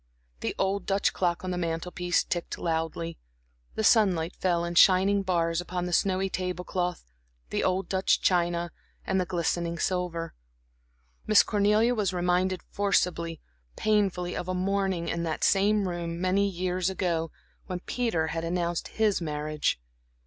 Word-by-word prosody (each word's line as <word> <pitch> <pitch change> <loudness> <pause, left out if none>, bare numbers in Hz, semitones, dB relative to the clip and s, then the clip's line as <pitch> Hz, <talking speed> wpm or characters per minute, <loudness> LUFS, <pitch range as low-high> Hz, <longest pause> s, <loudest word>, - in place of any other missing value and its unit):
The - - -3
old 195 0 -1
Dutch 195 0 +1
clock 175 -1 0
on 185 - -3
the 180 - -2
mantel 165 +1 -2
piece 180 0 +1
ticked 175 -1 -3
loudly, 165 0 -2 0.6
the 220 - -1
sunlight 185 -7 +3
fell 170 -2 0
in 170 - -3
shining 190 +3 +5
bars 170 -3 0
upon 180 0 -3
the 180 - -3
snowy 190 +1 +2
table 180 -1 -3
cloth, 175 - -3 0.4
the - - 0
old 185 0 0
Dutch 190 +1 +2
china, 175 -1 +1 0.3
the 190 -1 +1
glistening 170 -1 -1
silver. 175 -2 -2 0.9
Miss 215 -1 +7
Cornelia 210 +3 +3
was 205 -5 0
reminded 180 +1 0
forcibly, 175 -5 0 0.3
painfully, 195 -4 +1
of 180 - -4
a 185 - -1
morning 190 -2 0
in 170 - -2
that 160 -2 -2
same 200 0 +3
room 170 -1 -4
many 190 +2 +2
years 180 0 -1
ago, 170 -4 -1 0.4
when 180 -1 -3
Peter 200 -11 -1
had 165 +1 -3
announced 170 0 -1
his 215 -4 +2
marriage. 150 - -1
180 Hz, 150 wpm, -27 LUFS, 170-195 Hz, 0.9 s, Miss